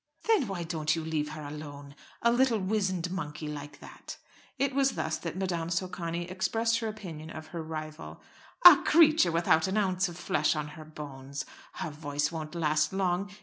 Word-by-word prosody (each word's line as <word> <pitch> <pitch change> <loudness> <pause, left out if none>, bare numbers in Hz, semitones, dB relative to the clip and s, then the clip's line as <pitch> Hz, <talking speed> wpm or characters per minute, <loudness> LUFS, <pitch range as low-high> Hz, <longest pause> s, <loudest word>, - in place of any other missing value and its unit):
"Then 425 - +3
why 185 -3 -3
don't 160 -2 0
you 165 -1 -4
leave 155 -2 -1
her 155 -1 -7
alone? 145 -1 -8 0.3
A 235 - +5
little 245 -1 +3
wizened 190 -3 -1
monkey 155 -4 -4
like 145 -1 -7
that!" - - -10 0.4
It 275 0 +1
was 275 0 +2
thus 160 - -2
that 170 0 -5
Madame 175 -3 -2
Socani 175 -1 -2
expressed 225 +5 0
her 225 - -2
opinion 170 -8 -7
of 155 -1 -9
her 170 0 -5
rival. 155 0 -7 0.5
"A 350 -5 +13
creature 310 - +5
without 165 0 +3
an 190 +3 -1
ounce 190 -2 +1
of 170 - -9
flesh 155 -3 +1
on 150 -1 -3
her 155 +1 -10
bones. 140 -3 -7 0.3
Her 155 - -4
voice 145 0 -2
won't 160 0 -6
last 155 -2 +1
long. 190 0 0
165 Hz, 180 wpm, -29 LUFS, 155-195 Hz, 0.5 s, A